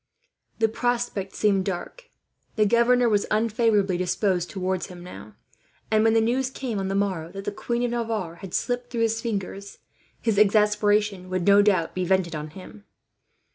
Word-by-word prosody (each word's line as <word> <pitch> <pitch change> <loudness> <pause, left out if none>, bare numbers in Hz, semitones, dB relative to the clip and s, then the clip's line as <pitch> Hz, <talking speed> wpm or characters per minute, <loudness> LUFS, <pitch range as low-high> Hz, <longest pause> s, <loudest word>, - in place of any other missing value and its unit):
The 225 - +3
prospect 235 -4 -2
seemed 195 -3 +2
dark. 200 - -5 0.5
The 215 - +3
governor 235 +3 +4
was 205 -3 +1
unfavourably 215 -3 +2
disposed 180 0 0
towards 185 -1 -2
him 175 -1 -11
now; 180 - -11 0.6
and 215 0 +4
when 225 0 +3
the - - +5
news 250 +3 0
came, 250 -5 -4
on 190 - -2
the 195 - -2
morrow, 185 -5 -1
that 195 0 -7
the - - -1
Queen 235 +3 -2
of 240 - 0
Navarre 220 -8 -3
had 185 0 -7
slipped 245 -1 -2
through 235 -2 -3
his 225 0 +1
fingers, 200 -3 -5 0.4
his 220 -4 +1
exasperation 210 -2 +2
would 185 -1 -2
no 200 0 +6
doubt 190 -5 +2
be 185 - -2
vented 180 -2 +1
on 150 0 -5
him. 150 - -13
205 Hz, 175 wpm, -25 LUFS, 185-230 Hz, 0.6 s, no